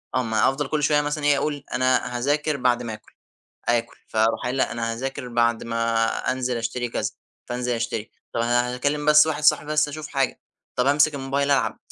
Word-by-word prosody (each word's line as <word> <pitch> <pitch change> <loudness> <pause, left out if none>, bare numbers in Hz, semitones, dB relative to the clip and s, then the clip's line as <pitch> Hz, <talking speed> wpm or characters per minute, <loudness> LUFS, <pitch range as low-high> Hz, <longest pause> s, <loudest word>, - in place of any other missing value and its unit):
آه 130 - +2
ما 110 -1 +2
أفضل 135 +1 -2
كل 150 0 -1
شوية 150 +1 +3
مثلًا 150 0 -3
إيه، 145 -1 +4
أقول 145 0 -2
أنا 130 -1 +1
هاذاكر 145 +3 0
بعد 125 -2 +1
ما 115 -2 -4
آكل، 110 - -13 0.6
آكل 120 0 0
فاروح 110 +1 +1
قايل 125 +2 -2
لأ، - - +1
أنا 115 0 -2
هاذاكر 130 +1 -5
بعد 120 -1 +1
ما 115 0 +1 0.3
أنزل 125 -1 -2
أشتري 120 +2 -2
كذا، - - -2 0.4
فانزل 125 0 -2
أشتري، 115 -2 -3 0.2
طَب 115 - 0
أنا 120 +1 +1
هاكلِّم 145 +4 -1
بس 150 +1 +7
واحد 150 -1 -2
صاحبي 150 0 +3
بس 150 -1 +3
أشوف 155 +1 -7
حاجة، 135 -2 -1 0.4
طَب 125 - +1
أمسك 145 +2 +4
الموبايل 140 +1 -1
ألعب. 140 - +1
130 Hz, 195 wpm, -24 LUFS, 120-145 Hz, 0.6 s, بس